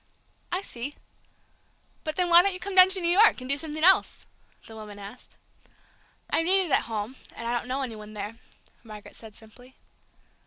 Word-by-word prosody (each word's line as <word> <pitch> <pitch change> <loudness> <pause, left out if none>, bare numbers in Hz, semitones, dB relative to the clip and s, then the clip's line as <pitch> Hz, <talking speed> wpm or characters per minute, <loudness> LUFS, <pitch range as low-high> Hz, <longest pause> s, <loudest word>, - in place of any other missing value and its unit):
"I 365 +3 -2
see. 260 -2 -6 1.1
But 310 -1 -3
then 360 0 0
why 345 0 +8
don't 390 0 0
you - - -6
come 400 +2 -6
down 370 0 +8
to 380 0 0
New 340 0 +1
York, 440 -8 +6
and 255 - -9
do 280 - +3
something 310 +1 -5
else?" 380 +2 +3 0.4
the 225 - -12
other 220 - -9
woman 210 -1 -10
asked. 205 +5 -12 0.9
"I'm 330 - +1
needed 375 -3 +3
at - - +2
home, 220 +2 -5 0.2
and 230 - -6
I 240 - -1
don't 240 - -4
know 265 +2 -2
any 235 -4 -5
one 215 0 -11
there," 210 +1 -6 0.5
Margaret 215 -3 -12
said 220 -2 -13
simply. 245 +4 -17
255 Hz, 195 wpm, -26 LUFS, 220-350 Hz, 1.1 s, why